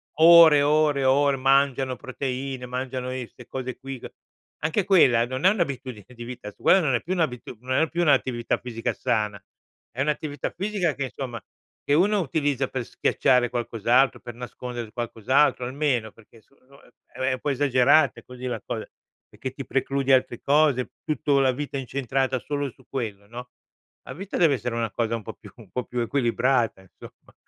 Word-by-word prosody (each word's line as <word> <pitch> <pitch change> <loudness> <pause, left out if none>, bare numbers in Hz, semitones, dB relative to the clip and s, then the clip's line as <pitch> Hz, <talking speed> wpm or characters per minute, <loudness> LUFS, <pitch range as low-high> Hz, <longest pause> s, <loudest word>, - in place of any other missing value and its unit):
ore, 160 -2 +8
ore, 150 -1 +2
ore, 135 +1 +3
mangiano 135 -1 +2
proteine, 130 0 -5
mangiano 130 0 -4
i 130 -2 -5
'ste 125 - -16
cose 130 -1 -5
qui, 135 -1 -7
c - - -9 0.5
anche 160 +6 +1
quella 130 - +5
non 130 +2 -5
è 190 - +9
un'abitudine 135 - -3
di 120 - -8
vita 120 -3 -8
su - - -27
quella 190 - +6
non 145 -6 +1
è 120 - +1
più 180 - -3
un'abitudu 130 -9 -2
non 130 0 0
è 160 - +1
più 170 - -1
un'attività 130 -6 +1
fisica 115 -2 -3
sana. 105 -3 -1 0.5
È 125 - -5
un'attività 145 -1 -2
fisica 190 -4 -1
che 135 -2 -4
somma, 120 -5 -6 0.4
che 145 - 0
uno 200 +6 +3
utilizza 145 -5 0
per 130 -2 -4
schiacciare 125 +1 +2
qualcos'altro, 120 +2 +1
per 120 - -9
nascondere 120 -1 -7
qualcos'altro, 125 +4 +1
almeno, 130 -4 -1
perché 115 +1 -20
so 140 - -31
no 140 0 -18 0.3
è - - -15
è 130 0 +1
un 130 - -4
po' 145 - -2
esagerate 140 +1 +3
così 125 0 -10
la 125 - -3
cos - - -4 0.5
perché 130 - -6
ti 135 0 -7
precludi 135 0 0
altre 130 -2 +2
cose, 140 -3 +2
tutto 150 -2 +1
la 135 -1 +3
vita 145 +1 -4
incentrata 130 0 -1
solo 145 +1 -3
su 130 +1 -20
quello, 105 -6 -5
no. 125 +3 -9 0.5
La - - -8
vita 195 +3 -7
deve 160 -5 +4
essere 120 -2 -4
una 115 -2 -2
cosa 115 -1 -1
un 115 - -6
po' 110 - -7
più 105 - -15
un 110 -6 -16
po' 125 +3 -3
più 125 - -4
equilibrata, 120 -2 +1
insomma. 95 - -16
130 Hz, 180 wpm, -25 LUFS, 120-145 Hz, 0.5 s, è